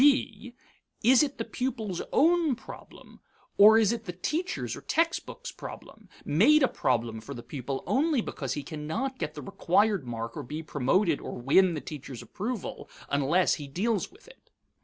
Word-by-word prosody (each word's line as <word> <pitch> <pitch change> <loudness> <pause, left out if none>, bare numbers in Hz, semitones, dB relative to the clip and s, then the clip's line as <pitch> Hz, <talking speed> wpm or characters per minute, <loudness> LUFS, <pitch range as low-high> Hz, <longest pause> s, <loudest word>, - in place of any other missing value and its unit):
(b) 250 -4 +2 0.5
Is 250 +3 +6
it 285 -2 -1
the - - -3
pupil's 230 -8 -3
own 325 -2 +3
problem, 250 - -13 0.4
or 215 +2 +9
is 220 -2 +4
it 230 -1 -6
the 180 - -4
teacher's 315 - -3
or - - -9
textbook's 335 +9 -1
problem, - - -11 0.2
made 265 - +5
a - - +6
problem 115 - -1
for 140 +5 -8
the 120 - -8
pupil 135 +1 -5
only 295 +1 +2
because 135 - -3
he 145 - -4
cannot 170 - -4
get - - -4
the - - -7
required 195 - +1
mark 115 -1 -5
or - - -4
be 150 +6 -6
promoted 155 +4 +1
or - - -6
win 170 +8 +4
the 150 - -4
teacher's 135 -5 -8
approval, 215 +2 -5 0.2
unless 145 +6 +2
he 145 - -7
deals 200 +8 -1
with 415 +6 -20
it? - - -18
200 Hz, 170 wpm, -28 LUFS, -, 0.5 s, or